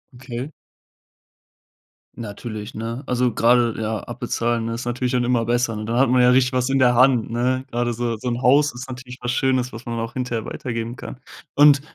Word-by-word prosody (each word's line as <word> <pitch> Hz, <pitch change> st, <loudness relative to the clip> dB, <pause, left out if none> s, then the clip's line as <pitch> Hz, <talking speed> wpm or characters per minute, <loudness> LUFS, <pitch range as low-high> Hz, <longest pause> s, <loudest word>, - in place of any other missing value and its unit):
Okay. 130 Hz, +3 st, -6 dB, 1.6 s
Natürlich, 110 Hz, 0 st, -7 dB
ne? 115 Hz, +5 st, -5 dB
Also, 125 Hz, -1 st, +1 dB
gerade 120 Hz, 0 st, +3 dB
ja 110 Hz, -1 st, -2 dB
abbezahlen, 120 Hz, -1 st, -2 dB
ne, 115 Hz, -, -2 dB
ist 120 Hz, +1 st, -5 dB
natürlich 125 Hz, +1 st, -1 dB
dann 125 Hz, -1 st, +1 dB
immer 120 Hz, -2 st, +1 dB
besser. 120 Hz, 0 st, +1 dB
Und 105 Hz, 0 st, -5 dB
dann 115 Hz, +2 st, -1 dB
hat 135 Hz, -1 st, +4 dB
man 125 Hz, 0 st, +4 dB
ja 125 Hz, -, +6 dB
richtig 130 Hz, 0 st, +4 dB
was 125 Hz, 0 st, +1 dB
in 135 Hz, 0 st, +2 dB
der 125 Hz, -1 st, +4 dB
Hand, 125 Hz, -3 st, +4 dB
ne? 125 Hz, +2 st, 0 dB
Gerade 120 Hz, 0 st, 0 dB
so 120 Hz, -1 st, -2 dB
so 125 Hz, -, -6 dB
'n 120 Hz, +1 st, -1 dB
Haus 145 Hz, +3 st, +4 dB
ist 125 Hz, +2 st, -8 dB
natürlich 125 Hz, 0 st, -9 dB
was 120 Hz, -, -3 dB
Schönes, 130 Hz, -1 st, +1 dB
was 115 Hz, +3 st, -10 dB
man 115 Hz, -1 st, -3 dB
auch 115 Hz, +4 st, -4 dB
hinterher 125 Hz, -4 st, -2 dB
weitergeben 115 Hz, -1 st, -4 dB
kann. 125 Hz, -, -9 dB, 0.3 s
Und 145 Hz, -1 st, +6 dB
120 Hz, 200 wpm, -22 LUFS, 115-130 Hz, 1.6 s, ja